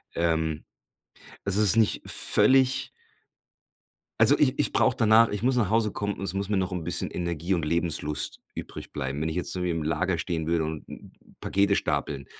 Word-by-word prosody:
ähm 80 Hz, -2 st, -1 dB, 0.8 s
es 100 Hz, 0 st, +1 dB
ist 105 Hz, 0 st, +6 dB
nicht 110 Hz, -2 st, +2 dB
völlig 130 Hz, 0 st, +3 dB, 1.3 s
also, -, -, +6 dB
ich -, -, +2 dB
ich -, -, 0 dB
brauche -, -, +2 dB
danach 110 Hz, +1 st, +5 dB
ich 105 Hz, +2 st, -5 dB
muss 130 Hz, 0 st, +1 dB
nach 105 Hz, -5 st, +1 dB
Hause 110 Hz, -2 st, +1 dB
kommen 100 Hz, 0 st, -3 dB
und 95 Hz, -, -7 dB
es 95 Hz, -, -2 dB
muss 100 Hz, 0 st, -3 dB
mir 105 Hz, -, -1 dB
noch 95 Hz, 0 st, -2 dB
'n 90 Hz, -3 st, -4 dB
bisschen 85 Hz, -, -1 dB
Energie 85 Hz, +1 st, -3 dB
und 85 Hz, -4 st, -1 dB
Lebenslust 80 Hz, -2 st, -2 dB
übrig -, -, -9 dB
bleiben. 70 Hz, 0 st, -4 dB
Wenn 80 Hz, -, -1 dB
ich 80 Hz, -, -4 dB
jetzt 90 Hz, -, -3 dB
irgendwie 90 Hz, -1 st, -2 dB
im 80 Hz, -2 st, -3 dB
Lager 85 Hz, +3 st, -1 dB
stehen 80 Hz, -1 st, -3 dB
würde 85 Hz, -1 st, 0 dB
und 80 Hz, -1 st, -6 dB, 0.6 s
Pakete 100 Hz, +1 st, +1 dB
stapeln. 70 Hz, -7 st, -2 dB
90 Hz, 185 wpm, -26 LUFS, 80-100 Hz, 1.3 s, ist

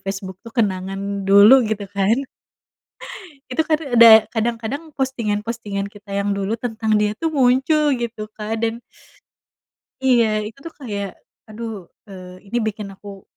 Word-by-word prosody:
Facebook 195 Hz, -1 st, -6 dB
tuh 230 Hz, -, -11 dB
kenangan 195 Hz, -1 st, -2 dB
dulu 205 Hz, +7 st, +8 dB
gitu 215 Hz, -2 st, -2 dB
kan 200 Hz, +3 st, +2 dB, 1.3 s
itu, 255 Hz, +5 st, +1 dB
kan 310 Hz, -1 st, +1 dB, 0.2 s
ada 230 Hz, 0 st, +9 dB, 0.2 s
kadang-kadang 235 Hz, +7 st, -3 dB
postingan-postingan 215 Hz, -5 st, -3 dB
kita 205 Hz, 0 st, -13 dB
yang 200 Hz, 0 st, -1 dB
dulu 200 Hz, +1 st, -2 dB
tentang 220 Hz, -2 st, -1 dB
dia 210 Hz, 0 st, 0 dB
tuh 325 Hz, +6 st, -2 dB
muncul 280 Hz, +3 st, +3 dB
gitu 235 Hz, -3 st, -5 dB
Kak 220 Hz, +1 st, -4 dB
dan, 230 Hz, +1 st, -2 dB, 1.2 s
iya 230 Hz, -5 st, +3 dB
itu 215 Hz, +5 st, -9 dB
tuh 330 Hz, +4 st, -10 dB
kayak 205 Hz, -8 st, -6 dB, 0.3 s
aduh, 215 Hz, -4 st, -7 dB, 0.2 s
eee, 185 Hz, -1 st, -11 dB
ini 240 Hz, -, 0 dB
bikin 210 Hz, -2 st, -4 dB
aku 195 Hz, -1 st, -12 dB
215 Hz, 135 wpm, -20 LUFS, 200-240 Hz, 1.3 s, ada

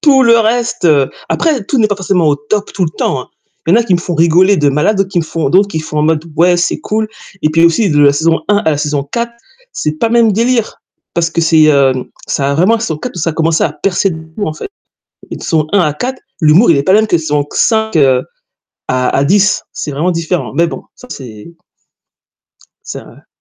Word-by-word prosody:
Tout 275 Hz, -3 st, +4 dB
le 230 Hz, -2 st, +5 dB
reste, 235 Hz, +1 st, -1 dB
heu 145 Hz, -5 st, +3 dB, 0.2 s
après 285 Hz, -10 st, 0 dB
tout 270 Hz, +4 st, -1 dB
n'est 220 Hz, -, +4 dB
pas 205 Hz, -, -1 dB
forcément 185 Hz, -4 st, 0 dB
au 145 Hz, -, +2 dB
top 200 Hz, +9 st, -3 dB
tout 190 Hz, -, -1 dB
le 160 Hz, -, -3 dB
temps, 140 Hz, -3 st, -2 dB
hein. -, -, -12 dB, 0.4 s
Il 170 Hz, -, +3 dB
y -, -, +5 dB
en -, -, +4 dB
a -, -, -2 dB
qui 190 Hz, -5 st, +1 dB
me 175 Hz, -, 0 dB
font 175 Hz, 0 st, -4 dB
rigoler 175 Hz, +5 st, +4 dB
de 150 Hz, -3 st, +2 dB
malade, 150 Hz, +9 st, +1 dB
d'autres 195 Hz, -1 st, 0 dB
qui 180 Hz, -, 0 dB
me 165 Hz, -, -1 dB
font 160 Hz, -2 st, -2 dB
d'autres 195 Hz, +7 st, +3 dB
qui 160 Hz, -5 st, -4 dB
font 155 Hz, -1 st, -5 dB
en -, -, +2 dB
mode, 155 Hz, 0 st, 0 dB
ouais, 175 Hz, +2 st, +4 dB
c'est 175 Hz, -, -1 dB
cool, 215 Hz, 0 st, -2 dB, 0.3 s
et 155 Hz, -, +2 dB
puis 165 Hz, +2 st, +3 dB
aussi 170 Hz, +4 st, +2 dB
de 145 Hz, -1 st, +2 dB
la 140 Hz, -1 st, +5 dB
saison 160 Hz, +3 st, +1 dB
1 205 Hz, -, +3 dB
à 160 Hz, -5 st, 0 dB
la 145 Hz, -, -2 dB
saison 145 Hz, -2 st, -2 dB
4, 235 Hz, +11 st, -4 dB, 0.4 s
c'est 150 Hz, -, -2 dB
pas 230 Hz, -, +1 dB
le 230 Hz, -, -1 dB
même 230 Hz, -2 st, +4 dB
délire. 230 Hz, +2 st, -1 dB, 0.3 s
Parce 165 Hz, -1 st, +1 dB
que 170 Hz, -, -1 dB
c'est, 160 Hz, -1 st, +4 dB
hem, 135 Hz, -4 st, +2 dB, 0.2 s
ça 140 Hz, 0 st, -1 dB
a -, -, -1 dB
vraiment 185 Hz, +9 st, +3 dB
la 230 Hz, -, -2 dB
saison 165 Hz, -9 st, -3 dB
4, 250 Hz, -, -6 dB
où -, -, -5 dB
ça 165 Hz, -, 0 dB
a -, -, -6 dB
commencé 160 Hz, 0 st, 0 dB
à 155 Hz, -, -1 dB
percer 185 Hz, +5 st, -1 dB
de 160 Hz, -, -6 dB, 0.2 s
fou 205 Hz, -, -3 dB
en 155 Hz, -, -5 dB
fait. -, -, -7 dB, 0.6 s
Les -, -, -6 dB
saisons 155 Hz, -2 st, 0 dB
1 200 Hz, -, +4 dB
à 155 Hz, -4 st, +1 dB
4, 255 Hz, -, -5 dB, 0.2 s
l'humour, 165 Hz, +6 st, +5 dB
il 160 Hz, -, +4 dB
est -, -, 0 dB
pas 185 Hz, -, +1 dB
le 205 Hz, -, +6 dB
même 220 Hz, -, 0 dB
que 175 Hz, -, +1 dB
saison 150 Hz, -2 st, -1 dB
q 145 Hz, -, -11 dB
5 220 Hz, -4 st, +1 dB
heu, 135 Hz, -4 st, +3 dB, 0.7 s
à 130 Hz, -1 st, 0 dB
à 135 Hz, -, +2 dB
10, 200 Hz, +7 st, +2 dB
c'est -, -, -5 dB
vraiment 150 Hz, +6 st, -1 dB
différent, 165 Hz, -1 st, -3 dB
mais 170 Hz, +3 st, +2 dB
bon, -, -, -7 dB
ça 250 Hz, -, -15 dB
c'est 120 Hz, +3 st, -10 dB, 1.3 s
C'est -, -, -7 dB
vrai. -, -, -18 dB
170 Hz, 260 wpm, -13 LUFS, 150-210 Hz, 1.3 s, le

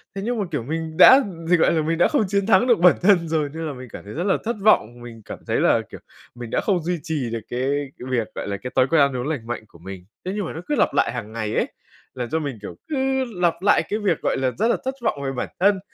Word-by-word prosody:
Thế 195 Hz, -, -4 dB
nhưng 240 Hz, 0 st, -1 dB
mà, 205 Hz, -, 0 dB
kiểu, 145 Hz, -7 st, -2 dB
mình 160 Hz, +4 st, -4 dB
đã 260 Hz, +9 st, +9 dB, 0.2 s
dịch 175 Hz, +1 st, +3 dB
gọi -, -, +4 dB
là, 160 Hz, -, +1 dB
mình 165 Hz, +2 st, -1 dB
đã 175 Hz, -, +4 dB
không 285 Hz, -7 st, +1 dB
chiến 200 Hz, 0 st, 0 dB
thắng 195 Hz, +2 st, +4 dB
được 235 Hz, -7 st, +4 dB
bản 180 Hz, +1 st, +6 dB
thân 180 Hz, -3 st, +4 dB
rồi, 155 Hz, -2 st, 0 dB
nên 165 Hz, +1 st, -5 dB
là 150 Hz, -, -4 dB
mình 130 Hz, -1 st, -10 dB
cảm -, -, -9 dB
thấy 105 Hz, -, -9 dB
rất 170 Hz, -, -3 dB
là 190 Hz, 0 st, +2 dB
thất 235 Hz, +2 st, -1 dB
vọng, 120 Hz, -, +3 dB
mình 115 Hz, -2 st, -10 dB
cảm -, -, -8 dB
thấy -, -, +1 dB
là, -, -, +3 dB
kiểu, -, -, -10 dB, 0.4 s
mình 120 Hz, -1 st, -8 dB
đã -, -, 0 dB
không 185 Hz, -5 st, 0 dB
duy 175 Hz, +1 st, -2 dB
trì 145 Hz, -7 st, -2 dB
được 115 Hz, -, -2 dB
cái 125 Hz, -, -3 dB, 0.4 s
cái 125 Hz, -, -8 dB
việc, 120 Hz, -4 st, 0 dB
gọi -, -, -5 dB
là, 100 Hz, 0 st, -3 dB
cái 125 Hz, +5 st, -7 dB
thói 130 Hz, -, +4 dB
quen 165 Hz, +1 st, +3 dB
ăn 140 Hz, -2 st, +2 dB
uống 125 Hz, +2 st, -3 dB
lành 140 Hz, -8 st, -4 dB
mạnh 120 Hz, -1 st, -4 dB
của 85 Hz, -, -19 dB
mình. 95 Hz, +1 st, -9 dB, 0.2 s
Thế 185 Hz, -, -2 dB
nhưng 205 Hz, -2 st, -2 dB
mà -, -, -6 dB
nó 160 Hz, -, -6 dB
cứ 295 Hz, -, 0 dB
lặp -, -, +2 dB
lại -, -, +2 dB
hàng 115 Hz, -3 st, -6 dB
ngày 110 Hz, -2 st, -3 dB
ấy, -, -, +1 dB, 0.5 s
làm 125 Hz, -2 st, -5 dB
cho 160 Hz, -, 0 dB
mình, 140 Hz, -6 st, -4 dB
kiểu, 105 Hz, -, -8 dB
cứ 265 Hz, -3 st, 0 dB, 0.2 s
lặp 170 Hz, -1 st, +1 dB
lại 200 Hz, +2 st, +4 dB
cái 210 Hz, -, -1 dB
việc, 195 Hz, -7 st, 0 dB
gọi -, -, 0 dB
là, 130 Hz, -1 st, 0 dB
rất 220 Hz, +5 st, +2 dB
là 235 Hz, -, +2 dB
thất 265 Hz, -, -1 dB
vọng 150 Hz, -11 st, -1 dB
về 135 Hz, -, -2 dB
bản 125 Hz, -, -4 dB
thân, 195 Hz, +1 st, +3 dB
160 Hz, 300 wpm, -22 LUFS, 125-195 Hz, 0.5 s, đã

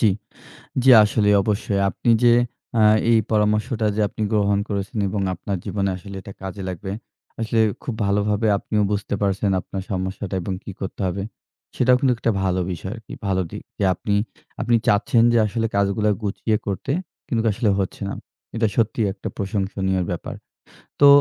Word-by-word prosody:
জি, 110 Hz, -, +4 dB, 0.8 s
জি 135 Hz, -, +5 dB
আসলে 105 Hz, 0 st, +2 dB
অবশ্যই। 105 Hz, 0 st, -1 dB
আপনি 120 Hz, -, -2 dB
যে 120 Hz, -, +7 dB, 0.5 s
আ -, -, +5 dB, 0.3 s
এই 115 Hz, -, +6 dB
পরামর্শটা 105 Hz, +2 st, +1 dB
যে 110 Hz, -, +1 dB
আপনি 110 Hz, -, -8 dB
গ্রহণ 100 Hz, -1 st, +2 dB
করেছেন 100 Hz, +3 st, -3 dB
এবং 100 Hz, 0 st, -2 dB
আপনার 95 Hz, +2 st, -4 dB
জীবনে 100 Hz, 0 st, -1 dB
আসলে 100 Hz, +2 st, -9 dB
এটা 100 Hz, -, -10 dB
কাজে 95 Hz, +1 st, -6 dB
লাগবে। 95 Hz, +2 st, -5 dB, 0.5 s
আসলে 115 Hz, 0 st, 0 dB, 0.2 s
খুব 125 Hz, -, -3 dB
ভালোভাবে 105 Hz, +2 st, +1 dB
আপনিও 105 Hz, +1 st, 0 dB
বুঝতে 105 Hz, 0 st, -1 dB
পারছেন 100 Hz, 0 st, +1 dB
আপনার 95 Hz, -, -6 dB
সমস্যাটা 95 Hz, +1 st, -3 dB
এবং 95 Hz, -, -3 dB
কী -, -, -7 dB
করতে 95 Hz, -, -5 dB
হবে। 95 Hz, +2 st, -3 dB, 0.5 s
সেটাও 125 Hz, 0 st, +4 dB
কিন্তু 130 Hz, -2 st, +3 dB
একটা 115 Hz, -, +1 dB
ভালো 95 Hz, -1 st, +1 dB
বিষয় 95 Hz, +3 st, -5 dB
আরকি। 115 Hz, -3 st, -11 dB
ভালো 95 Hz, -1 st, +1 dB
দিক। -, -, -7 dB, 0.2 s
যে 100 Hz, -, +2 dB
আপনি 100 Hz, +2 st, -1 dB, 0.5 s
আপনি 120 Hz, -, +2 dB
চাচ্ছেন 115 Hz, +3 st, +4 dB
যে 120 Hz, -, +4 dB
আসলে 115 Hz, +2 st, -1 dB
কাজগুলো 100 Hz, +1 st, +2 dB
গুছিয়ে 105 Hz, +2 st, 0 dB
করতে 100 Hz, +7 st, -3 dB, 0.4 s
কিন্তু 115 Hz, -6 st, 0 dB
আসলে 110 Hz, 0 st, +1 dB
হচ্ছে 95 Hz, -, -3 dB
না। -, -, -4 dB, 0.4 s
এটা 110 Hz, -1 st, +2 dB
সত্যিই 115 Hz, -1 st, +1 dB
একটা 95 Hz, -, -7 dB
প্রশংসনীয় 95 Hz, -1 st, -1 dB
ব্যাপার। -, -, -5 dB, 0.7 s
তো 145 Hz, -, +8 dB
105 Hz, 165 wpm, -22 LUFS, 95-110 Hz, 0.8 s, তো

